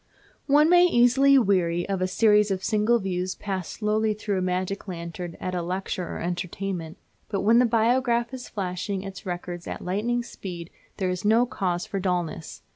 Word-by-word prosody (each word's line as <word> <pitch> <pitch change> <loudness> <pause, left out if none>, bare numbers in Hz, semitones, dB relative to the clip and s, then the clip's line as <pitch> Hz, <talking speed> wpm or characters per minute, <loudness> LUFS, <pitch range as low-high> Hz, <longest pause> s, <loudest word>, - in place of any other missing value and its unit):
One 295 +2 +5
may 355 +1 +6
easily 270 0 +5
weary 180 -7 +2
of 195 -2 -2
a 185 - +2
series 210 +1 +4
of 190 -1 -2
single 215 +3 +2
views 185 -3 -2
passed 190 -4 -4
slowly 215 0 0
through 205 -2 -2
a - - -2
magic 185 +2 -2
lantern 170 -1 -6
at 185 - -4
a 180 - -1
lecture 180 0 -3
or - - -5
entertainment. 175 -1 -4 0.3
But 200 -2 -1
when 225 +4 +5
the 250 - +4
Biograph 235 +1 +2
is 255 -1 -7
flashing 190 0 -3
its 195 -1 -8
records 175 -1 -5
at - - -6
lightning 230 +6 -1
speed 175 -7 -8 0.3
there 185 -2 0
is 180 0 -4
no 225 +4 +4
cause 180 -7 -2
for 195 - -3
dullness. 175 -3 -3
195 Hz, 180 wpm, -25 LUFS, 180-225 Hz, 0.3 s, may